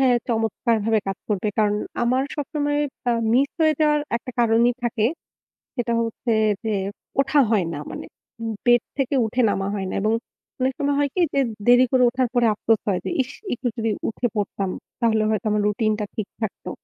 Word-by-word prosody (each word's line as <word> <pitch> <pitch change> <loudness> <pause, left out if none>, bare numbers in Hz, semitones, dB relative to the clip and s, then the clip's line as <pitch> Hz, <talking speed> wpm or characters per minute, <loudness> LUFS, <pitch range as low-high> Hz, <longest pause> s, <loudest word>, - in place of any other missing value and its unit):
হয় 260 -2 +5 0.2
চমৎকারভাবে 225 -1 +1
কাজ 195 - -3
করবে। 210 0 0
কারণ 210 -1 +3 0.3
আমার 255 +3 +2
সবসময় 290 0 -1 0.3
আ - - +4 0.2
miss 270 +4 +3
হয়ে 310 -1 +4
যাওয়ার 300 -1 +4 0.2
একটা 245 +2 -7
কারণই 235 +1 +4
থাকে, 225 -2 +1 0.7
সেটা 240 -2 -1
হচ্ছে 230 +1 -1 0.3
যে 220 -1 -1 0.5
ওঠা 275 +2 +2
হয় 205 -6 +3
না, - - -4
মানে - - -6 0.4
উব 225 -1 -3
bed 240 -1 +6 0.2
থেকে 275 +1 0
উঠে 235 +3 0
নামা 195 -1 -1
হয় 190 -2 -3
না - - -3
এবং 215 +2 +2 0.5
অনেক 260 +1 +1
সময় 285 -1 +1
হয় 285 -1 +2
কী 365 - +2
যে 275 - +2 0.3
দেরি 245 +1 +7
করে 255 -1 +4
ওঠার 255 +1 0
পরে 240 -1 +3
আফসোস 220 +1 +1
হয় 190 -3 +1
যে - - -1
ইশ! 260 - -5 0.2
একটু 245 +1 -3
যদি 225 -1 0 0.2
উঠে 240 +2 -1
পড়তাম 200 -2 -2 0.3
তাহলে 220 -2 +3
হয়তো 215 -1 -1
আমার 210 0 +2
routine 215 +1 +1
টা 210 - -1
ঠিক 215 -3 -3
থাকতো। 220 -3 -4
235 Hz, 190 wpm, -23 LUFS, 215-260 Hz, 0.7 s, দেরি